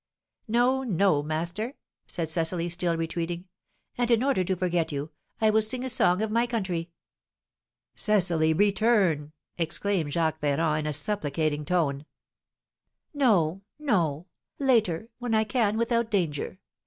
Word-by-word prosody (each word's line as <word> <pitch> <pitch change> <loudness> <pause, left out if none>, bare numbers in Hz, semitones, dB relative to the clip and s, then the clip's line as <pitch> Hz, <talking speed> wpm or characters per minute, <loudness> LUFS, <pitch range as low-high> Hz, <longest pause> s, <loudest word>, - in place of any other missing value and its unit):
"No, 245 +4 +2
no, 195 - +2
master!" 170 - -3 0.3
said 165 -2 -2
Cecily, 165 +2 0
still 175 -1 0
retreating. 170 +2 -3 0.5
"And 245 -1 +1
in 235 0 +3
order 265 -9 +2
to 185 +1 -1
forget 175 -3 0
you, 145 +2 -4 0.3
I 220 -1 +4
will 220 +1 +3
sing 245 +4 +1
a - - -1
song 205 -5 +3
of 220 - -2
my 235 +2 +2
country." 185 -8 -2 1.1
"Cecily, 175 -7 +3
return!" 195 -5 +2 0.3
exclaimed 165 -1 -1
Jacques 160 -2 0
Ferrand, 150 +1 +1
in 155 - -4
a 150 - 0
supplicating 150 -3 -1
tone. 150 -4 0 1.1
"No, 195 - +2 0.2
no! 175 - 0 0.3
Later, 225 - +1
when 240 -2 -1
I 220 - +3
can 215 -1 0
without 235 0 +1
danger. 175 -5 -1
180 Hz, 135 wpm, -27 LUFS, 160-220 Hz, 1.1 s, I